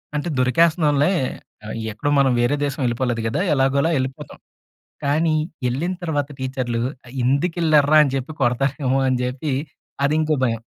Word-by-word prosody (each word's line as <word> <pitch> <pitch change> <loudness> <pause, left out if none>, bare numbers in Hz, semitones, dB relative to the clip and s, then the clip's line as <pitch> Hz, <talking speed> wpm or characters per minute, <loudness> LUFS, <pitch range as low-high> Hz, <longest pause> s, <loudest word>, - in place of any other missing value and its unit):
అంటే 150 +4 -2
దొరికేస్తున్నాంలే 150 +3 +3 0.5
ఆహ్, 110 - -5 0.2
ఎక్కడో 130 +7 -3
మనం 135 -2 +4
వేరే 125 +4 +2
దేశం 140 0 -4
వెళ్ళిపోలేదు 120 -1 -1
కదా! 115 +11 -1
ఎలాగోలా 140 +4 +2
వెళ్ళిపోతాం. 130 0 -5 0.7
కానీ 155 +3 +2 0.4
ఎళ్ళిన 165 +9 -2
తర్వాత 145 -3 -1
టీచర్లు 130 -3 -2 0.3
ఆహ్, 120 - -13
ఎందుకెళ్లారు 155 +1 +2
రా! 155 - +8
అని 135 - -2
చెప్పి 135 +4 -4
కొడతారేమో 135 +2 +1
అని 130 -1 +1
చెప్పి 135 +4 -3 0.5
అది 145 - +2
ఇంకో 155 0 +1
భయం. 115 -2 -1
140 Hz, 145 wpm, -21 LUFS, 125-155 Hz, 0.7 s, రా